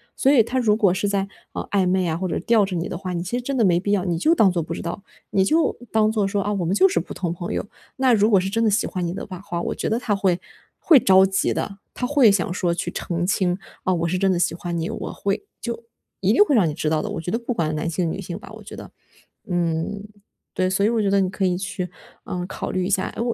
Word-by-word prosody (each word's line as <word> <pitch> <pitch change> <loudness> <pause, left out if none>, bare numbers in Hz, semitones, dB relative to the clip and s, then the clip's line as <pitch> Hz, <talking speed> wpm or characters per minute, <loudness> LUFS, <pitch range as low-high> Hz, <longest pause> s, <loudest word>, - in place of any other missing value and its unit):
所 265 - +2
以 255 -6 +6
他 255 +4 -1
如 215 -4 +3
果 200 -5 +3
是 205 +2 -1
在， 200 -1 0 0.3
呃， - - -4
暧 195 -2 +2
昧 185 0 +2
啊 160 -1 -1
或 185 +2 -2
者 - - -2
吊 220 +2 +3
着 190 -1 -4
你 170 0 -2
的 - - -4
话， 185 0 -5
你 170 -1 -2
其 210 +7 -2
实 - - -3
真 275 +3 -3
的 240 - +3
没 175 -4 +4
必 200 +3 -1
要 195 -3 +1
你 175 -3 -1
就 315 - +3
当 210 - +5
做 175 -1 -1
不 165 +1 -5
知 - - -5
道， 170 +4 -5 0.3
你 190 -1 +2
就 320 +10 +2 0.2
当 215 -1 +3
做 210 -3 +1
说， 200 +1 -1
啊， 205 - -1
我 190 -4 -1
们 180 +4 0
就 190 -1 +5
是 170 - +1
普 170 - -7
通 175 -3 -3
朋 175 0 -5
友， - - -2 0.3
那 260 -2 +4
如 210 -1 +4
果 205 - +5
是 190 +1 -2
真 225 +3 0
的 220 - +4
喜 210 +3 +1
欢 180 -3 -3
你 170 - -3
的 - - -5
话 185 -3 -8
话， 175 -3 -4
我 - - -2
觉 - - -3
得 220 - +1
他 235 -3 -1
会 185 -3 +1 0.4
会 310 -6 +6
着 190 -3 +6
急 190 0 0
的， 200 - -4 0.2
他 250 - -3
会 270 -3 +5
想 185 -3 +1
说 175 -2 0
去 170 - -3
澄 175 0 -2
清， 180 -1 +1 0.3
啊， 185 - +1
我 170 -1 0
是 185 - 0
真 195 +1 +2
的 185 - +2
喜 175 - +1
欢 170 0 -4
你， 165 0 -2
我 - - -5
会 200 - -2 0.2
就 235 -1 -5 0.3
一 195 +2 +2
定 280 - +7
会 355 - 0
让 210 -9 +4
你 155 - -2
知 155 - -1
道 155 -1 +1
的， - - -4
我 165 - -4
觉 175 - -4
得 230 - 0
不 245 +1 -3
管 160 -7 -1
男 155 +2 -2
性 170 0 -1
女 195 - -5
性 175 -2 -6
吧 195 - -12
我 220 - -12
觉 205 - -10
得， - - -10 0.6
嗯， 175 +3 -1 0.5
对。 185 0 +1
所 195 +2 +1
以 - - +3
我 230 -1 +1
觉 200 - +1
得 200 0 +3
你 185 - +1
可 195 0 -1
以 180 -1 +1
去， 180 -1 -4 0.4
嗯， 180 0 -4
考 - - -5
虑 185 -1 -1
一 - - -2
下， 190 -2 +1
哎， - - -3
我 235 0 0
190 Hz, 320 characters per minute, -22 LUFS, 175-210 Hz, 0.6 s, 定